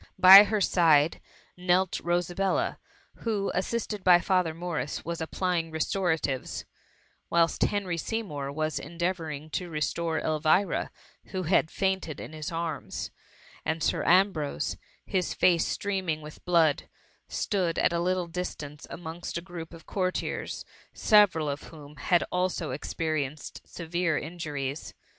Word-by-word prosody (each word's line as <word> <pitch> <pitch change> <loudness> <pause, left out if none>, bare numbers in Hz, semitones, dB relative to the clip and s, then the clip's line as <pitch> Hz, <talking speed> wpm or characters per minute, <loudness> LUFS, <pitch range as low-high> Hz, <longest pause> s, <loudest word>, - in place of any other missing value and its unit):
By 190 +2 +11
her 210 0 0
side, 165 -4 +4 0.3
knelt 180 +1 +1
Rosabella, 180 - 0 0.4
who, 210 -4 -1
assisted 210 +1 -2
by 180 -2 +7
Father 180 -3 +1
Morris, 165 -4 -4
was 170 0 -4
applying 170 0 -1
restoratives; 160 -4 -1 0.6
whilst 170 -1 +2
Hen 205 -1 +2
ty 175 -3 -3
Seymour 155 -9 -3
was 155 +1 -2
endeavouring 165 -2 -4
to 180 +1 -3
restore 160 +1 -1
Elvira, 155 +5 +1 0.4
who 185 -1 -4
had 165 -1 +3
fainted 190 -5 -1
in - - -8
his 155 0 -5
arms, 165 -1 -4 0.5
and 160 0 -1
Sir - - +1
Ambrose, 170 - +2 0.3
his 185 -2 -1
face 170 -2 +3
streaming 190 -6 -2
with 150 0 -11
blood, 165 -4 +3 0.4
stood 185 -6 -1
at - - +2
a 170 - +1
little 180 +1 0
distance 160 -4 -6
amongst 170 0 -6
a - - -1
group 175 -3 -8
of 165 -1 -13
courtiers, 185 -2 -2 0.3
several 200 -8 +4
of 140 0 -3
whom 150 -2 -12
had 175 +6 +2
also 180 -4 -1
experienced 150 +1 -3
severe 170 -1 -1
injuries. 150 -4 -5
170 Hz, 130 wpm, -28 LUFS, 155-185 Hz, 0.6 s, By